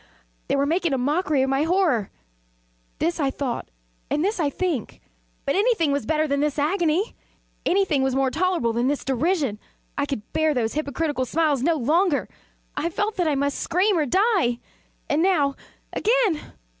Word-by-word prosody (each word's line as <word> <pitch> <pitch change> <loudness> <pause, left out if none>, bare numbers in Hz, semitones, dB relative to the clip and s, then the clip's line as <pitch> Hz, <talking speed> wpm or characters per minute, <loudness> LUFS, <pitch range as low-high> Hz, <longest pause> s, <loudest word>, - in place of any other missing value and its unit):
they - - +1
were 280 0 +2
making 335 0 +1
a - - +1
mockery 295 +2 +1
of 265 - 0
my 270 +1 +2
horror! 320 - +2 0.9
this 335 +1 -1
I 280 -3 +2
thought, 265 -2 -4 0.4
and 300 +4 +1
this 410 0 -1
I 300 -4 +2
think. 320 - -3 0.5
But 275 - +1
anything 400 -7 +2
was 280 -5 -1
better 310 0 +1
than 280 -1 0
this 295 0 0
agony! 340 +5 +1 0.5
Anything 370 -7 +2
was 265 -1 +1
more 270 -1 +2
tolerable 335 -8 +1
than 240 +2 +1
this 285 +1 -1
derision! 270 - 0 0.4
I 285 - 0
could 245 -7 -5
bear 315 -2 +2
those 225 -3 0
hypocritical 290 -2 -1
smiles 295 0 +1
no 330 +4 +2
longer! 310 +4 +1 0.5
I 335 - -1
felt 415 +5 -2
that 355 -3 +1
I 300 - +2
must 280 +1 -1
scream 375 +4 +2
or 310 -4 +1
die! 375 - +2 0.5
and 295 +2 +1
now 320 -7 +3 0.4
again! 445 -9 +1
305 Hz, 170 wpm, -24 LUFS, 275-355 Hz, 0.9 s, now